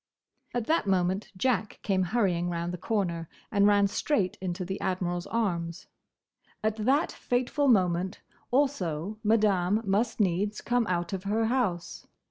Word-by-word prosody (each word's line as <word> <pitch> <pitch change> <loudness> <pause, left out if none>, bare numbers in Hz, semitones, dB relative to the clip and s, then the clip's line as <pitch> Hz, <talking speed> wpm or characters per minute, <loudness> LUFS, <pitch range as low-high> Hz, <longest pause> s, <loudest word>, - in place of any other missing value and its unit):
At 240 -2 0
that 315 -6 +1
moment 190 +1 +1
Jack 220 0 0
came 195 -2 +1
hurrying 180 -3 +1
round 170 0 -2
the - - -4
corner 175 -6 -1 0.2
and 200 -1 +4
ran 205 -1 +5
straight 200 0 0
into 180 -1 -3
the 190 +2 -4
Admiral's 175 -1 -1
arms. 180 -6 -2 0.8
At 215 0 +1
that 265 +8 +2
fateful 255 +4 0
moment 185 -4 +2 0.3
also 215 - 0
Madame 210 -2 +2
must 215 +5 0
needs 205 +2 +1
come 240 -2 0
out 175 0 -1
of 190 0 -4
her 220 +3 +1
house. 220 -8 -1
200 Hz, 140 wpm, -28 LUFS, 180-225 Hz, 0.8 s, ran